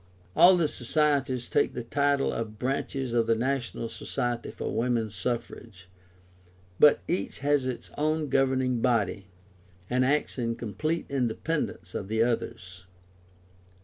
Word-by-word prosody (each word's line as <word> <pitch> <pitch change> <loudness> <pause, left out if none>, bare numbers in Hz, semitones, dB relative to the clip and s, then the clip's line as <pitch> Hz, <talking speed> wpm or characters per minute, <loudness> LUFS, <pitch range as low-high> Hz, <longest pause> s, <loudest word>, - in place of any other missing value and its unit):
All 180 +1 +8
the 165 -3 +2
Societies 135 -2 0
take - - +1
the 120 - -3
title 140 +3 +1
of 110 -2 -4
branches 135 0 -2
of 115 -1 +2
the 115 - +4
National 120 -1 -2
Society 120 +1 -3
for - - -5
Women's 115 -2 0
Suffrage; 100 -4 -5 0.9
but 150 - +6
each 175 - -2
has 145 -2 +2
its 130 - -5
own 155 0 +1
governing 130 -2 +2
body, 100 -5 +1 0.6
and 125 +1 +3
acts 140 0 0
in 115 -1 -1
complete 155 - -2
independence 140 +4 -2
of 95 - -4
the 110 +2 +2
others. 115 -5 -3
125 Hz, 130 wpm, -28 LUFS, 115-140 Hz, 0.9 s, All